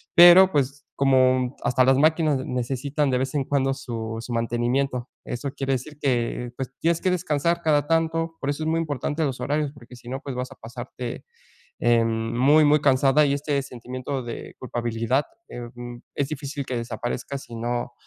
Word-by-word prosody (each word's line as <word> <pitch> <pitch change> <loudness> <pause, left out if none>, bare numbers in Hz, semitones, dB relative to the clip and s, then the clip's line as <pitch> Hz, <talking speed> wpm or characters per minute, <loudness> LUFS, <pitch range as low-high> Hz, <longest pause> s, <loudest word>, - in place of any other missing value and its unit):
pero 175 +2 +9
pues, 140 -1 0
como 130 -1 +3
hasta 125 +1 +3
las 130 0 +5
máquinas 155 -2 +3
necesitan 135 +4 -1
de 125 - +2
vez 130 +2 -2
en 140 - +1
cuando 135 -1 +1
su 115 -4 -5
su 120 - -6
mantenimiento. 120 +2 0 0.2
Eso 130 +3 -4
quiere 135 0 -1
decir 140 +4 -5
que, 120 -2 0
pues, 135 -1 -4
tienes 165 0 +1
que 185 - +2
descansar 170 -1 0
cada 150 -2 +3
tanto. 165 0 0
Por 140 - -2
eso 145 +2 -2
es - - -2
muy 165 +1 +1
importante 150 0 -2
los 135 -3 -3
horarios, 145 0 0
porque 125 -3 -14
si 120 - -12
no, 135 +1 -4
pues 135 -3 -6
vas 125 +1 -4
a - - -21
pasarte, 120 +1 -7 0.5
em, 115 0 +1
muy, 145 +5 +6
muy 150 +1 +5
cansada, 140 +1 +4
y 140 - +2
este 145 0 0
sentimiento 130 +1 -5
de 120 -1 -7
culpabilidad, 120 +1 -1 0.3
eh, 120 -1 -7
mm, 120 0 -8 0.2
es 140 -1 -1
difícil 140 -1 -5
que 125 - -3
desaparezca, 120 +3 -4
si 120 -3 -10
no 120 +1 -3
135 Hz, 185 wpm, -24 LUFS, 120-145 Hz, 0.5 s, pero